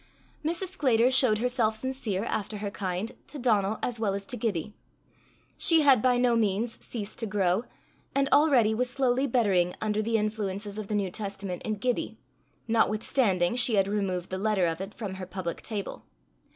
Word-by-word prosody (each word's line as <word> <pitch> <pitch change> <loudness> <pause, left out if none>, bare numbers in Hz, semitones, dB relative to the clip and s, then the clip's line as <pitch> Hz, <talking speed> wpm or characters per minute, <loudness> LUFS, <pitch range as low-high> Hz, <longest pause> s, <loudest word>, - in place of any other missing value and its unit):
Mrs. 340 +4 -1
Sclater 255 -9 +2
showed 255 -4 +5
herself 235 -2 +1
sincere, 220 -5 -2
after 210 -2 -3
her 205 0 -4
kind, 190 +2 -3 0.2
to 295 - -9
Donal 215 -5 +1
as 240 -2 -2
well 205 -3 0
as 200 0 -5
to 245 - -5
Gibbie. 210 -5 -2 0.9
She 325 -2 +5
had 270 -6 +6
by 250 0 +3
no 245 -1 +3
means 220 +1 -1
ceased 215 -3 -6
to 225 - -1
grow, 200 +1 +1 0.5
and 275 0 +3
already 265 -8 +4
was 250 +3 0
slowly 260 +1 +1
bettering 195 -8 +2
under 215 0 0
the 225 +1 +1
influences 210 -1 -3
of 210 - -6
the 210 - -2
New 195 -3 -1
Testament 195 -3 -5
in 215 - -2
Gibbie, 245 +4 -2 0.5
notwithstanding 215 -3 +2
she 245 -2 +5
had 195 -1 +3
removed 190 -4 -2
the 185 - -2
letter 205 -3 +2
of 165 +1 -2
it 195 +2 -7
from 205 -4 -5
her 185 - -6
public 185 -2 -5
table. 205 -3 -5
215 Hz, 180 wpm, -28 LUFS, 195-245 Hz, 0.9 s, had